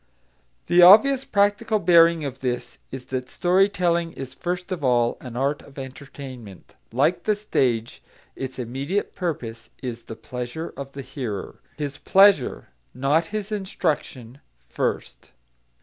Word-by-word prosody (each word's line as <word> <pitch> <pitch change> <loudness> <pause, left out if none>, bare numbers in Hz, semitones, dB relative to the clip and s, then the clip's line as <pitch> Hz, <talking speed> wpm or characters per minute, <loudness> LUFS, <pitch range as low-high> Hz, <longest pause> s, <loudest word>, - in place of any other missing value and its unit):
The 175 +1 +4
obvious 235 +9 +8
practical 205 +2 +2
bearing 170 -3 +5
of 135 -1 -5
this 125 -2 -4
is 130 -1 -8
that 130 0 -3
story 185 +3 +3
telling 170 -3 0
is 135 -1 -7
first 180 +1 -4
of 175 -5 -3
all 120 -2 +2
an 125 -2 -9
art 140 +3 0
of 140 - -17
entertainment; 130 - -10 0.2
like 180 - +1
the 215 - +2
stage, 125 - -1 0.3
its 130 -1 -6
immediate 135 - -3
purpose 120 -10 -5
is 120 -2 -5
the 115 - -8
pleasure 125 +8 -6
of 140 0 -8
the 140 - -7
hearer, 125 -6 -6 0.2
his 145 -1 -4
pleasure, 195 -8 +4 0.3
not 140 +6 +2
his 210 +3 -5
instruction, 155 - -3 0.3
first. - - -4
140 Hz, 135 wpm, -24 LUFS, 125-180 Hz, 0.3 s, obvious